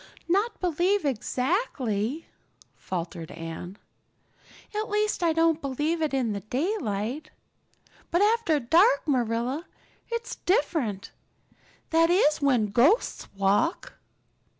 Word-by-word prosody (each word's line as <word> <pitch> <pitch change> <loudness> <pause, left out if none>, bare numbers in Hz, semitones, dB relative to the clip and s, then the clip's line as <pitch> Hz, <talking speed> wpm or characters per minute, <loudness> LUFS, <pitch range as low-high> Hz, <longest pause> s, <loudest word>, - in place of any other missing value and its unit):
"Not 405 +6 +1
believe 360 +2 +1
exactly," 260 - -1 0.5
faltered 170 -2 -5
Anne. 165 +3 -7 1.0
"At 430 +1 -2
least, 420 -1 0
I 340 -1 +3
don't 325 0 +2
believe 295 +5 -1
it 310 - 0
in 255 -5 0 0.2
daylight. 270 - -2 0.8
But 345 +4 +2
after 425 -8 +2
dark, 285 - +4
Marilla, 250 +4 -1 0.4
it's 465 0 -4
different. 285 - 0 0.8
That 330 0 +4
is 325 -5 +3
when 245 -7 +2
ghosts 290 - +2
walk." 200 - +1
300 Hz, 100 wpm, -26 LUFS, 230-350 Hz, 1.0 s, dark